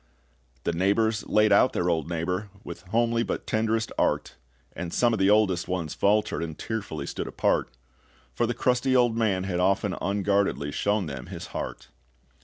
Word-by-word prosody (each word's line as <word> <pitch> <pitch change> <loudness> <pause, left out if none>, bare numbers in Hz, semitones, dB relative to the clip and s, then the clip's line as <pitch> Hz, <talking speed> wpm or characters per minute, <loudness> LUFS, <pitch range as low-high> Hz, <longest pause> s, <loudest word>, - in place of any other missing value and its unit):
The 85 - 0
neighbors 110 +5 +1
laid 105 0 +3
out 100 +5 +5
their 90 - 0
old 80 -2 0
neighbor, 90 +4 -2
With - - -8
homely 115 +3 +1
but - - -3
tenderest 110 +1 0
art; - - 0 0.4
And 85 -1 -5
some 120 +4 +2
of 110 - -1
the 95 0 +4
oldest 100 -4 +3
ones 90 -4 -2
faltered, 105 -3 +1
And 80 -2 -5
tearfully 100 -10 -4
stood - - -4
apart; - - 0 0.6
For 120 - 0
the 120 - -2
crusty 125 +1 +1
old 120 -2 +4
man 105 -5 +1
had 90 -2 -2
often 95 +1 +1
unguardedly 100 -6 0
shown 100 +4 0
them 70 -4 -7
his - - -7
heart. - - -5
100 Hz, 170 wpm, -26 LUFS, 90-110 Hz, 0.6 s, out